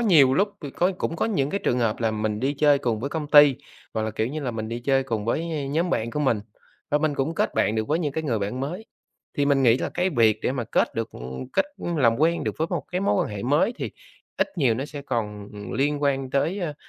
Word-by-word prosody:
nhiều 155 Hz, -, +5 dB
lúc 200 Hz, +5 st, +3 dB, 0.5 s
cũng 165 Hz, -, -2 dB
có -, -, 0 dB
những 160 Hz, -11 st, 0 dB
cái 200 Hz, -, -1 dB
trường 125 Hz, -, +2 dB
hợp 115 Hz, -3 st, 0 dB
là 115 Hz, -1 st, +2 dB
mình 105 Hz, -1 st, -2 dB
đi 140 Hz, +3 st, 0 dB
chơi 145 Hz, -1 st, +5 dB
cùng 120 Hz, -6 st, -1 dB
với 140 Hz, +4 st, -3 dB
công 155 Hz, -2 st, -3 dB
ty, 145 Hz, -3 st, +8 dB, 0.4 s
hoặc 110 Hz, -, 0 dB
là, 110 Hz, -, -1 dB
kiểu 110 Hz, +1 st, -1 dB
như 150 Hz, +5 st, -4 dB
là, 135 Hz, -4 st, -2 dB
mình 110 Hz, -1 st, -4 dB
đi 120 Hz, +1 st, -4 dB
chơi 135 Hz, +1 st, +2 dB
cùng 115 Hz, -5 st, -3 dB
với, 120 Hz, +6 st, 0 dB
ơ, 150 Hz, -4 st, -2 dB
nhóm 165 Hz, +4 st, 0 dB
bạn 115 Hz, -7 st, 0 dB
của 150 Hz, -, -2 dB
mình, 125 Hz, -7 st, +2 dB, 0.5 s
và 150 Hz, -, +3 dB
mình 155 Hz, -1 st, 0 dB
cũng 140 Hz, +4 st, -1 dB
kết -, -, 0 dB
bạn 110 Hz, -, +2 dB
được 110 Hz, 0 st, -1 dB
với 155 Hz, +3 st, +2 dB
những 150 Hz, -5 st, -1 dB
cái 160 Hz, -, -2 dB
người 120 Hz, -6 st, 0 dB
bạn 105 Hz, +6 st, -3 dB
mới. 180 Hz, +11 st, -4 dB, 0.5 s
Thì 140 Hz, -, +3 dB
mình 140 Hz, -1 st, +3 dB
nghĩ 120 Hz, 0 st, +5 dB
là -, -, -2 dB
cái 180 Hz, +1 st, +1 dB
việc 115 Hz, -6 st, +3 dB
để -, -, +1 dB
mà 130 Hz, -3 st, -2 dB
kết 110 Hz, -, 0 dB
được 115 Hz, 0 st, -3 dB, 0.4 s
kết -, -, +3 dB
làm 135 Hz, -10 st, +2 dB
quen 165 Hz, +3 st, +2 dB
được -, -, -2 dB
với 160 Hz, -, +1 dB
một -, -, -2 dB
cái 180 Hz, -, 0 dB
mối 195 Hz, -, +2 dB
quan -, -, -5 dB
hệ 100 Hz, -, -5 dB
mới 150 Hz, -, +2 dB
thì -, -, -3 dB, 0.5 s
ít -, -, +1 dB
nhiều 125 Hz, -7 st, +3 dB
nó 130 Hz, -, -3 dB
sẽ 145 Hz, -1 st, -8 dB
còn 105 Hz, -6 st, -3 dB, 0.2 s
liên 145 Hz, +3 st, 0 dB
quan 135 Hz, -2 st, 0 dB
tới, 160 Hz, +8 st, 0 dB
ơ, 165 Hz, -6 st, -3 dB
135 Hz, 265 wpm, -25 LUFS, 115-155 Hz, 0.5 s, ty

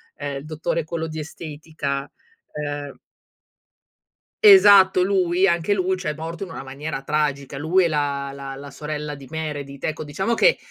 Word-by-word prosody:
Ehm, 140 Hz, -1 st, -4 dB
il 135 Hz, -, -8 dB
dottore 155 Hz, +1 st, -2 dB
quello 165 Hz, 0 st, -3 dB
di 160 Hz, 0 st, -6 dB
estetica, 150 Hz, -3 st, -5 dB, 0.4 s
ehm 145 Hz, -1 st, -5 dB, 1.5 s
Esatto 200 Hz, -, +8 dB
lui, 185 Hz, -1 st, +2 dB
anche 170 Hz, +4 st, +1 dB
lui 185 Hz, -1 st, 0 dB
ciòè 165 Hz, -5 st, -3 dB
morto 165 Hz, +3 st, -6 dB
in -, -, -11 dB
una -, -, -7 dB
maniera 135 Hz, +2 st, -5 dB
tragica. 140 Hz, -1 st, -1 dB
Lui 165 Hz, +6 st, +3 dB
e 170 Hz, -, +3 dB
la 140 Hz, -2 st, -1 dB
la 135 Hz, -1 st, -7 dB
la 140 Hz, +1 st, -9 dB
sorella 150 Hz, +1 st, -5 dB
di 140 Hz, -2 st, -11 dB
Meredith, 145 Hz, -3 st, -5 dB
ecco 155 Hz, 0 st, -3 dB
diciamo 190 Hz, +10 st, -1 dB
che, 480 Hz, -, +4 dB
155 Hz, 155 wpm, -23 LUFS, 145-170 Hz, 1.5 s, Esatto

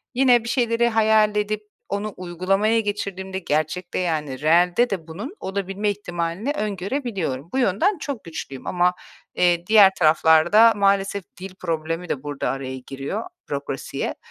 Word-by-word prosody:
Yine 245 Hz, -2 st, +4 dB
bir 230 Hz, -, -5 dB
şeyleri 235 Hz, -2 st, +2 dB
hayal 220 Hz, -1 st, +3 dB
edip 210 Hz, 0 st, -1 dB, 0.3 s
onu 205 Hz, +1 st, -3 dB
uygulamaya 195 Hz, +5 st, +1 dB
geçirdiğimde 195 Hz, -2 st, -3 dB
gerçekte, 155 Hz, +2 st, -2 dB
yani, 150 Hz, -6 st, -2 dB
reelde 175 Hz, +9 st, +3 dB
de 180 Hz, -5 st, -4 dB
bunun 210 Hz, -, -7 dB
olabilme 195 Hz, +1 st, -2 dB
ihtimalini 175 Hz, +3 st, -3 dB
öngörebiliyorum. 195 Hz, -, -3 dB
Bu -, -, 0 dB
yönden 265 Hz, -, +2 dB
çok 280 Hz, -7 st, -5 dB
güçlüyüm. 150 Hz, -5 st, -8 dB
Ama, 180 Hz, 0 st, +2 dB, 0.4 s
eee, 175 Hz, -1 st, +2 dB
diğer 205 Hz, -3 st, +7 dB
taraflarda 160 Hz, +8 st, +5 dB
maalesef 200 Hz, -1 st, +1 dB, 0.2 s
dil 185 Hz, 0 st, -8 dB
problemi 165 Hz, 0 st, -3 dB
de 135 Hz, 0 st, -3 dB
burada 145 Hz, -1 st, -3 dB
araya 130 Hz, -1 st, -4 dB
giriyor, 140 Hz, +11 st, -4 dB, 0.3 s
bürokrasiye. -, -, -4 dB
190 Hz, 135 wpm, -23 LUFS, 165-215 Hz, 0.4 s, diğer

